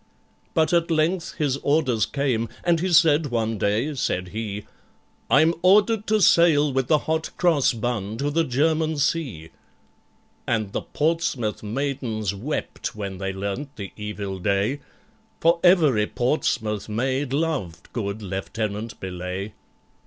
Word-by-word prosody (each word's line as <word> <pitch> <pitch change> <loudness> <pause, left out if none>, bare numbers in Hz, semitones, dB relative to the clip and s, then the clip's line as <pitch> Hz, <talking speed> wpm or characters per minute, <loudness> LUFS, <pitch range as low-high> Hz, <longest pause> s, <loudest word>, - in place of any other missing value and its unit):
But 160 +2 +2
at 170 0 +2
length 165 +2 0
his 145 -4 0
orders 135 -7 +1
came, 125 -6 -1
and 170 -2 +2
he 185 +2 -1
said 160 -2 +5
one 115 -4 -1
day, 110 +10 0
said 90 -8 -2
he, 105 0 -5 0.6
"I'm 160 +1 +5
ordered 210 +3 +4
to 215 0 +2
sail 155 -5 +5
with 130 -1 0
the 155 - +5
Hot 160 0 -1
Cross 160 -8 +3
Bun 110 -2 -3
to 145 +4 -1
the 165 +2 +2
German 155 +3 +1
Sea." 140 - -1 1.0
And 110 -4 0
the - - -2
Portsmouth 150 -8 -1
maidens 115 -3 -2
wept 115 +5 -4
when 100 -3 -5
they 95 0 -2
learnt 100 +9 -5
the 100 -4 -7
evil 105 -2 -5
day, 100 +8 0 0.6
For 170 +1 +3
every 155 - +5
Portsmouth 110 -5 -1
maid 130 +5 -1
loved 135 - -2
good 105 -2 -3
LIEUTENANT 105 +3 -4
BELAYE. 95 +2 -5
125 Hz, 135 wpm, -24 LUFS, 105-155 Hz, 1.0 s, said